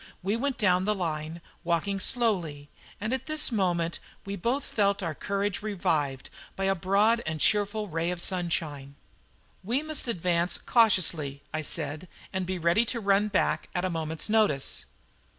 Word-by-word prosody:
We 200 +3 0
went 265 +1 -1
down 185 -3 +3
the 210 0 +1
line, 160 -2 -3 0.2
walking 175 +3 0
slowly, 180 - 0 0.3
and 215 +4 -2
at 260 -1 -3
this 310 -3 +3
moment 175 -6 0 0.3
we 200 0 -4
both 240 +9 -1
felt 200 -5 0
our 165 -2 -2
courage 200 +3 -2
revived 155 -10 -1 0.2
by 195 - -3
a 195 0 +3
broad 200 +6 +2
and 160 0 -2
cheerful 210 +2 +2
ray 165 -1 -1
of 180 -1 -3
sunshine. 165 -7 -2 0.7
"We 245 +9 0
must 310 -4 +1
advance 175 -4 +1
cautiously," 170 - +2
I 155 - -1
said, 155 +2 -1 0.3
"and 190 -1 -2
be 185 0 -2
ready 170 +6 +3
to 235 0 -1
run 200 0 +3
back 200 -3 0
at 180 +1 0
a 185 - -1
moment's 160 -1 -2
notice." 210 -11 +2
185 Hz, 160 wpm, -28 LUFS, 165-210 Hz, 0.7 s, down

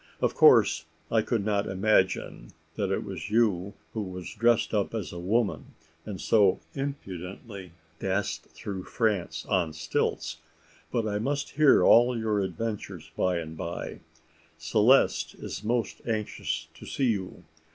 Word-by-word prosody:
"Of - - +1
course 80 0 +5 0.3
I 115 - +4
could 110 -2 -1
not 105 -1 +1
imagine 95 - +1 0.2
that - - -1
it - - 0
was - - -6
you 105 -3 +1 0.2
who 110 - -2
was 90 -2 -6
dressed 115 +1 +2
up 105 +1 0
as 100 -8 -4
a 85 - -6
woman, 105 +5 -1 0.3
and 100 -4 -5
so 100 -4 +4
impudently 100 - -6 0.3
danced 95 +1 -1
through 95 -2 -7
France 95 -8 -1
on 90 -6 0
stilts. 75 - -2 0.5
But 115 -3 0
I 105 -1 -1
must 140 +5 -2
hear 150 -1 +5
all 120 +1 +6
your 110 -2 0
adventures, 100 +3 -4
by 90 -1 +1
and 80 -1 -5
bye. 85 +2 -5 0.6
Celeste 105 +11 +3
is - - -7
most 115 +1 -1
anxious 110 -2 -2
to - - -12
see 130 -4 +1
you. 95 -4 -5
105 Hz, 140 wpm, -28 LUFS, 90-115 Hz, 0.6 s, all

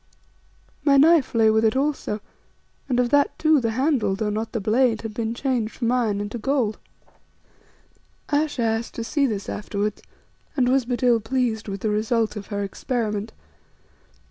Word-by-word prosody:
My 280 -1 +5
knife 305 -2 +4
lay 220 -1 +5
with 220 +1 +2
it 220 +1 +3
also, 270 -6 -1 0.7
and 250 -1 +1
of 245 -1 +1
that 285 0 +3
too 310 -3 +3
the 230 - 0
handle, 255 -6 +1
though 210 +1 -2
not 220 +2 -3
the 230 - -2
blade, 225 +2 +2
had 225 -1 -5
been 225 +1 -3
changed 245 -4 -1
from 235 -2 0
iron 230 -5 +1
into 205 +3 -4
gold. 240 -3 0 1.5
Ayesha 290 -4 0
asked 225 +1 -1
to 230 - -3
see 280 +4 +1
this 205 -4 -4
afterwards 205 0 -3 0.6
and 250 -2 +3
was 260 0 +2
but 245 +1 -3
ill 240 -2 +4
pleased 225 -1 -1
with 195 -1 -5
the 215 - 0
result 220 +1 0
of 200 -2 -7
her 205 -1 -3
experiment. 215 +1 -3
230 Hz, 170 wpm, -23 LUFS, 215-260 Hz, 1.5 s, My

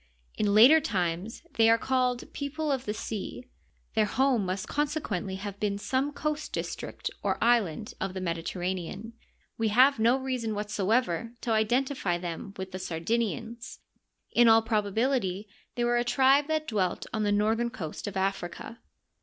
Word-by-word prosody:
In 205 -1 +1
later 265 +9 +8
times 185 - -2
they 225 0 +6
are 230 - +6
called 250 0 -1
"people 295 +2 -3
of 265 -2 -1
the 210 - -2
sea." 220 +2 -5 0.5
Their 220 -1 +3
home 255 -5 +2
must 190 +3 -3
consequently 285 - -2
have 200 +1 -6
been 205 -1 0
some 265 +7 -1
coast 300 +1 -3
district - - -4
or - - 0
island 225 -4 +1
of 190 -1 -3
\he - - -2
Mediterra 175 +1 -2
nean. 195 +5 -7 0.5
We 225 - +2
have 255 +4 +5
no 235 +4 +4
reason 255 -5 -2
whatsoever 210 +1 0
to 235 - -2
identify 220 -3 +1
them 175 +3 -6
with 190 0 -6
the 185 - -5
Sardinians. 225 +6 -3 0.5
In 240 0 +5
all 225 0 +6
probability 215 -1 0 0.3
they 240 - 0
were 240 0 +2
a 240 - +2
tribe 270 +3 +4
that 310 -1 -1
dwelt 190 - -1
on 220 - -1
the 205 -1 +1
northern 220 +3 +2
coast 190 -10 -6
of 200 -1 -4
Africa. 195 +3 -3
225 Hz, 160 wpm, -28 LUFS, 195-250 Hz, 0.5 s, later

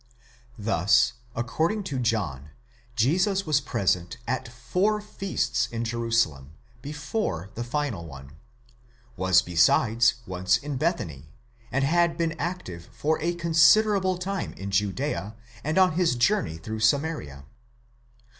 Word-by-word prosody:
Thus, 110 +3 +3 0.2
according 160 - -1
to 140 -9 -3
John, 95 - -1 0.5
Jesus 185 - +2
was 150 -2 +2
present 90 -9 -1
at 130 0 -2
four 180 - 0
feasts 195 -11 -2
in 115 -1 -4
Jerusalem, 115 - -1 0.3
before 145 - -3
the 120 - -4
final 120 - -3
one: 70 -2 -11 0.8
was 95 -1 +4
besides 110 +7 +3
once 95 +2 +1
in 145 +1 -5
Bethany, 85 - -2 0.4
and 135 +1 +1
had 170 +3 +2
been 165 -1 -1
active 145 - -5
for 155 +2 -1
a 170 +2 0
considerable 185 +4 +4
time 195 +2 -3
in 100 +1 -7
Judea 100 - -1 0.3
and 155 +4 -1
on 185 -1 +5
his 165 -5 +1
journey 145 - +1
through 110 +6 -6
Samaria. 110 - 0
125 Hz, 120 wpm, -26 LUFS, -, 0.8 s, on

